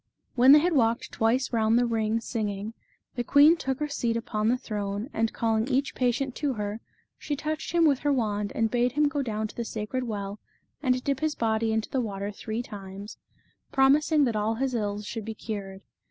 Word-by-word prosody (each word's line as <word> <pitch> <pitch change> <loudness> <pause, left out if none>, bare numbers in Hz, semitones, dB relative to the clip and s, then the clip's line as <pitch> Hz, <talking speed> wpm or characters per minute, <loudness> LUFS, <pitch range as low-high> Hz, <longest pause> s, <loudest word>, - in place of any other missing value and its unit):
When 255 +2 +6
they 295 - +10
had 345 +3 +2
walked 235 -4 +1
twice 245 +4 +1
round 225 0 +3
the 245 - +3
ring 225 -1 0
singing, 210 -2 -3 0.4
the 245 - -2
queen 290 +6 +6
took 265 -5 -3
her 300 - -1
seat 235 -5 -1
upon 215 -2 -2
the 245 +2 +3
throne, 210 0 -4
and 225 0 0
calling 225 0 0
each 275 +1 0
patient 255 +1 0
to 290 -3 0
her, 210 0 -4 0.4
she 295 - -3
touched 310 +2 -4
him 340 -1 +4
with 280 -4 +3
her 290 - +1
wand 210 -6 0
and 225 -1 +1
bade 245 0 +1
him 295 +1 +3
go 290 0 -1
down 220 -4 -2
to - - -13
the 235 - -3
sacred 225 +3 -3
well 205 -2 -4 0.4
and 255 -2 +1
dip 275 -2 0
his 310 0 -1
body 225 0 0
into 220 0 0
the 265 - +1
water 200 -2 -4
three 220 +3 -4
times, 200 -1 -9 0.5
promising 290 +3 +4
that 235 -5 +1
all 215 +2 0
his 260 +2 -1
ills 210 -2 -2
should 225 +1 -5
be 220 +1 -6
cured. 195 -3 -6
230 Hz, 205 wpm, -27 LUFS, 215-270 Hz, 0.5 s, they